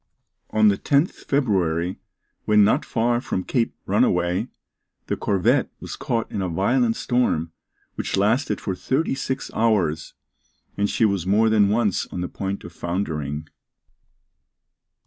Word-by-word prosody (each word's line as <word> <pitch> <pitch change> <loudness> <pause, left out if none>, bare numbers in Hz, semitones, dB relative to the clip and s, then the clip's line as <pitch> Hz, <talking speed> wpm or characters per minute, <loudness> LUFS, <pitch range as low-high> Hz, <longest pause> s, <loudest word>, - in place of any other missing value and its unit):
On 110 0 +4
the 100 - 0
10th 145 +5 +2 0.2
February, 95 - 0 0.5
when 105 -1 +5
not 100 - +3
far 120 +1 +1
from 95 - -2
Cape 115 +2 -1
Runaway, 90 +6 +1 0.6
the - - -1
corvette 115 +7 +1
was - - -7
caught 115 -1 -2
in 100 - -2
a 95 - -1
violent 115 +7 +1
storm, 120 -10 0 0.4
which - - -3
lasted 110 +9 +1
for 95 - -3
thirty 130 - -1
six 135 0 -3
hours, 90 -9 +1 0.6
and 100 0 0
she 115 - +2
was 100 -4 0
more 110 +3 +3
than 105 -2 +4
once 105 -2 +1
on 90 - -5
the 90 - -2
point 100 +2 -4
of 85 - -10
foundering. 80 -5 -3
100 Hz, 140 wpm, -23 LUFS, 90-120 Hz, 0.6 s, when